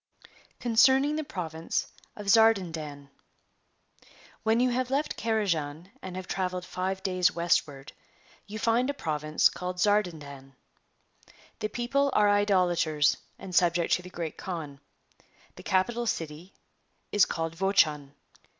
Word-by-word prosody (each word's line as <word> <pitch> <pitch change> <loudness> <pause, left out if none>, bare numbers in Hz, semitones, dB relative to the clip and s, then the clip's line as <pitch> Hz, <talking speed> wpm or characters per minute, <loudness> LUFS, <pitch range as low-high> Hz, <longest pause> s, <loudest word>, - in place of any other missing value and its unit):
Concerning 265 +5 +4
the 310 - -2
Province 165 - -4 0.2
of 210 - -8
Zardandan. 170 -10 +2 1.3
Whex 225 +1 +2
you 250 0 +2
liavc 250 +1 -1
left 280 +3 -1
Carajan 180 -7 -2
and 185 -1 -7
have 185 0 -6
travelled 185 -1 -2
rive 190 +1 -2
days 185 0 +1
westward, 150 -5 0 0.5
you 215 +2 -6
rind 235 +3 +2
a 285 - -2
province 155 - +1
called 180 0 -5
Zardaxuax. 160 -9 -1 1.1
The 215 - -1
people 275 +5 0
are 210 -1 +4
Idolaters 180 -7 +2 0.2
and 185 - -9
subject 175 -1 +3
to - - +2
the 180 - -11
Great 170 -3 -6
Kaan. 155 -7 -6 0.8
The - - -11
capital 235 +6 0
city 165 0 -4 0.6
is 205 - +5
called 165 0 -4
Vochax. 155 -6 +2
185 Hz, 125 wpm, -28 LUFS, 160-220 Hz, 1.3 s, is